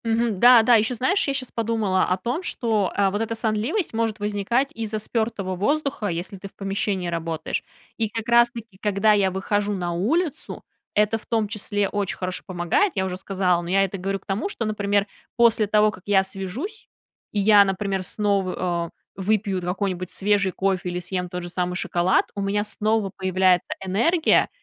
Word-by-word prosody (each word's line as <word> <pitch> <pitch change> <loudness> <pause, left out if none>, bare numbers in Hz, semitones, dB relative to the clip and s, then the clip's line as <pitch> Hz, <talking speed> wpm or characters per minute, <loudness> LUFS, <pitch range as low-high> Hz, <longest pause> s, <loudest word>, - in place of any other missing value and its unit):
Мгм. 225 -3 0
Да-да, 240 0 +7
ещё, 220 +3 +2
знаешь, 300 - +1
я 275 - +1
щас 255 -2 -3
подумала 220 -5 0
о 185 - 0
том, 240 - -2
что, 220 - 0
э, 200 -1 +3
вот 205 +2 -2
эта 225 0 -2
сонливость 225 - -1
может 225 -1 -1
возникать 210 +7 0
из-за 220 -3 -3
спёртого 215 -4 -2
воздуха, 280 +3 -1
если 175 +2 -4
ты 195 - -8
в - - -19
помещении 195 -2 -2
работаешь. 165 -1 -3 0.3
И 225 -2 0
как 225 +1 -5
раз 235 0 +5
таки, 230 -5 -11
когда 210 +1 +3
я 200 -2 +3
выхожу 205 +2 -1
на 175 -3 -2
улицу, 295 - -1 0.3
это 210 +2 +3
в - - -20
том 220 -2 +1
числе 205 -1 -1
очень 200 -1 -2
хорошо 185 0 -4
помогает, 185 - +1
я 190 -1 0
уже 185 -1 -3
сказала. 185 -2 0
Но 170 - -7
я 195 +2 +4
это 195 0 -3
говорю 195 +2 -2
к - - -31
тому, 200 - -2
что, 235 - -3
например, 205 -1 +1 0.3
после 230 -2 +4
того, 210 +1 +4
как 185 -3 -13
я 195 -2 +4
свяжусь, 230 - -6 0.4
и 210 - -1
я, 205 0 +7
например, 195 0 -1
снова, 185 -4 -1 0.3
э, - - -5
выпью 200 -1 0
какой-нибудь 185 0 -2
свежий 200 -1 +1
кофе 190 -1 -1
или 175 0 -3
съем 180 0 -3
тот 180 0 -5
же 175 - -5
самый 180 0 -2
шоколад, 180 0 +1
у 200 - -3
меня 200 +1 0
снова 215 -1 -1
появляется 185 -1 +2
энергия. 315 - +3
205 Hz, 185 wpm, -23 LUFS, 185-225 Hz, 0.4 s, Да-да